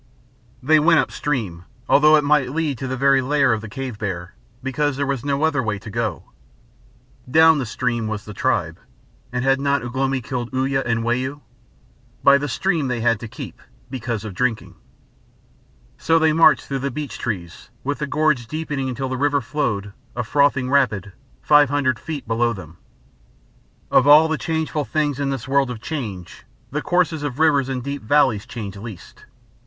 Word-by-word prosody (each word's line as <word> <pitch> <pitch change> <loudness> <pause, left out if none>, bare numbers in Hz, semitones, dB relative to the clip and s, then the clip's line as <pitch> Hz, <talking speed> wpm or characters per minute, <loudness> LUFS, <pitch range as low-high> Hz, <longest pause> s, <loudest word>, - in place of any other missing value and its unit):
They 155 +3 +5
went 165 +1 +5
up - - 0
stream, 105 -12 -3 0.2
although 150 +2 +6
it 150 - +3
might 145 -3 +2
lead 155 -6 -1
to 135 - -4
the 130 +1 -3
very 135 0 +4
lair 135 -2 +2
of 110 - -2
the 110 - -8
cave 130 -2 -6
bear, 90 -3 -4 0.3
because 135 +1 -1
there 140 - 0
was 135 -3 -2
no 140 +1 -1
other 155 -4 +2
way 110 -4 -2
to 105 +2 -10
go. 110 -5 -2 1.1
Down 160 +2 +6
the 130 - -3
stream 120 -1 -2
was 110 -1 -4
the 105 - -8
tribe, - - -1 0.5
and 125 0 -2
had 135 0 +3
not 140 -2 +1
Ugh 120 +1 -7
lomi 135 0 0
killed 120 -1 -4
Uya 135 +1 0
and 115 -1 0
Wau? 130 +5 -2 0.8
By 140 0 +6
the 145 - -3
stream 165 -1 0
they 120 -2 -2
had 115 -2 +2
to 115 - -7
keep 110 - -9 0.3
because 115 -4 -4
of 105 - -6
drinking. 115 +2 -2 1.3
So 165 0 +3
they 160 -1 +3
marched 160 -1 +5
through 135 0 -2
beech 145 +2 -6
trees, 90 -7 -5
with 145 +1 -2
the 150 - -2
gorge 150 -5 +1
deepening 145 -2 -3
until 130 +1 -3
the 130 0 -3
river 145 +1 +2
flowed, 105 -9 -2 0.2
a 120 - -1
frothing 135 +1 +2
rapid, 110 -9 +1 0.3
five 150 -2 +5
hundred 135 -4 0
feet 150 -6 -6
below 115 +1 +1
them. 85 -5 -11 1.1
Of 135 - +4
all 150 +2 +8
the 160 -1 -2
changeful 160 -2 -2
things 145 -3 -1
in 140 -1 -1
this 135 -3 -4
world 135 -1 +2
of 120 -3 -5
change, 110 - -6 0.3
the 150 +3 -2
courses 175 -3 +1
of 145 -3 -4
rivers 145 -4 +3
in 130 -1 -2
deep 140 +2 -5
valleys 120 -3 +2
change 105 -5 -6
least. 105 -2 -10
135 Hz, 180 wpm, -21 LUFS, 115-145 Hz, 1.3 s, all